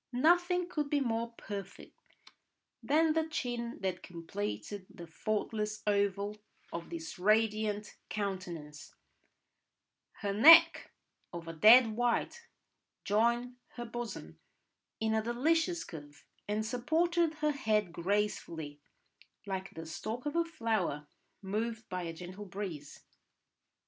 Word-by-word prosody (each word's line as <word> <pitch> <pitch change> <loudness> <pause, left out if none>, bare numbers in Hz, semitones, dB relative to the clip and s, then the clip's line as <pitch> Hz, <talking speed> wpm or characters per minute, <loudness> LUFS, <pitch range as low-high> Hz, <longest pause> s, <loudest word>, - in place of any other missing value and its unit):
Nothing 350 +6 +3
could 300 -5 -2
be 290 - +2
more 230 -3 -1
perfect 200 -2 -8 0.9
than 310 +2 +3
the 320 0 +1
chin 240 -6 -3
that 185 -2 -2
completed 165 - -5
the 195 -4 -10
faultless 210 +5 -3
oval 205 0 0 0.4
of 170 0 -5
this 165 +1 -7
radiant 215 +1 +1
countenance; 175 -7 -5 1.3
her 200 -2 -1
neck 330 +9 +8 0.4
of 170 -1 -7
a 165 - -5
dead 225 +8 +8
white, 245 - -1 0.6
joined 235 +4 +1 0.2
her 240 - -5
bosom 240 0 -6 0.6
in 220 0 0
a 220 - +2
delicious 325 +9 +1
curve, 145 -3 -11 0.2
and 210 +1 -1
supported 320 +7 +1
her 300 -1 +1
head 215 -9 0
gracefully 170 -6 -2 0.6
like 195 -1 -4
the 165 - -7
stalk 220 - -5
of 295 - -2
a 335 - +3
flower 220 - -1 0.4
moved 220 +3 -3
by 185 0 -3
a 165 -1 -4
gentle 185 +4 -8
breeze. 180 -7 -7
215 Hz, 115 wpm, -32 LUFS, 185-250 Hz, 1.3 s, neck